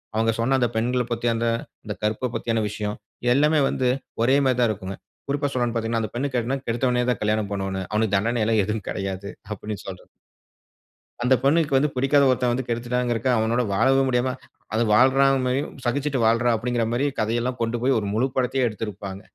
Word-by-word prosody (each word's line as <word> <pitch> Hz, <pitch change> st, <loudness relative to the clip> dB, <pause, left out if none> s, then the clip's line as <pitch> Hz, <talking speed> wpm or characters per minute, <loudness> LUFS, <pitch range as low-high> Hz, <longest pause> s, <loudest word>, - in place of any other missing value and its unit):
அவங்க 115 Hz, +1 st, +2 dB
சொன்ன 130 Hz, +4 st, +2 dB
அந்த 120 Hz, -2 st, +2 dB
பெண்கள 125 Hz, +2 st, +1 dB
பத்தி, 120 Hz, 0 st, -1 dB
அந்த 115 Hz, +1 st, 0 dB, 0.4 s
அந்த 105 Hz, -2 st, -4 dB
கற்ப 110 Hz, +4 st, 0 dB
பத்தின 115 Hz, -2 st, 0 dB
விஷயம், 105 Hz, 0 st, -4 dB, 0.4 s
எல்லாமே 150 Hz, +3 st, +3 dB
வந்து 130 Hz, -1 st, 0 dB, 0.3 s
ஒரே 130 Hz, +4 st, +4 dB
மாதிரி 130 Hz, -2 st, +2 dB
தான் 120 Hz, -, +4 dB
இருக்குங்க. 95 Hz, -1 st, -6 dB, 0.3 s
குறிப்பா 145 Hz, +1 st, 0 dB
சொல்லணும்னு 120 Hz, -2 st, 0 dB
பார்த்தீங்கன்னா, 115 Hz, 0 st, 0 dB
"அந்த 110 Hz, -, -4 dB
பெண்ணை 135 Hz, +4 st, 0 dB
கட்டுனா 125 Hz, +3 st, 0 dB
கெடுத்தவனே 125 Hz, +1 st, +1 dB
தான் -, -, -2 dB
கல்யாணம் 105 Hz, -1 st, 0 dB
பண்ணனும். 95 Hz, -1 st, -3 dB
அவனுக்கு 105 Hz, -1 st, +1 dB
தண்டனை 115 Hz, +4 st, 0 dB
எல்லாம் 110 Hz, -1 st, +3 dB
எதுவும் 105 Hz, 0 st, -3 dB
கிடையாது." 95 Hz, 0 st, -4 dB, 0.2 s
அப்டினு 105 Hz, +1 st, -6 dB
சொல்றது. 95 Hz, -2 st, -9 dB, 1.2 s
அந்த 125 Hz, +2 st, +4 dB
பெண்ணுக்கு 145 Hz, 0 st, +3 dB
வந்து 150 Hz, +3 st, +2 dB
பிடிக்காத 135 Hz, +2 st, +3 dB
ஒருத்தன் 125 Hz, -1 st, +2 dB
வந்து 130 Hz, +1 st, -2 dB
கெடுத்துட்டான்கிறக்காக 120 Hz, +1 st, 0 dB
அவனோட 115 Hz, +3 st, +1 dB
வாழவும் 135 Hz, +6 st, +3 dB
முடியாம 125 Hz, 0 st, +1 dB, 0.4 s
அது 110 Hz, +2 st, +2 dB
வாழ்றாள் 130 Hz, +4 st, +5 dB, 0.2 s
மாரியும் 130 Hz, +3 st, -1 dB
சகிச்சிட்டு 140 Hz, +2 st, 0 dB
வாழ்றாள் 115 Hz, +2 st, +3 dB
அப்டின்கிற 120 Hz, +1 st, -1 dB
மாரி 125 Hz, +4 st, +1 dB
கதையெல்லாம் 120 Hz, +3 st, -1 dB
கொண்டுபோய் 120 Hz, +3 st, +1 dB
ஒரு 105 Hz, -, -4 dB
முழு 120 Hz, +5 st, +2 dB
படத்தையே 130 Hz, 0 st, +1 dB
எடுத்திருப்பாங்க. 100 Hz, -3 st, -6 dB
120 Hz, 175 wpm, -24 LUFS, 110-130 Hz, 1.2 s, வாழ்றாள்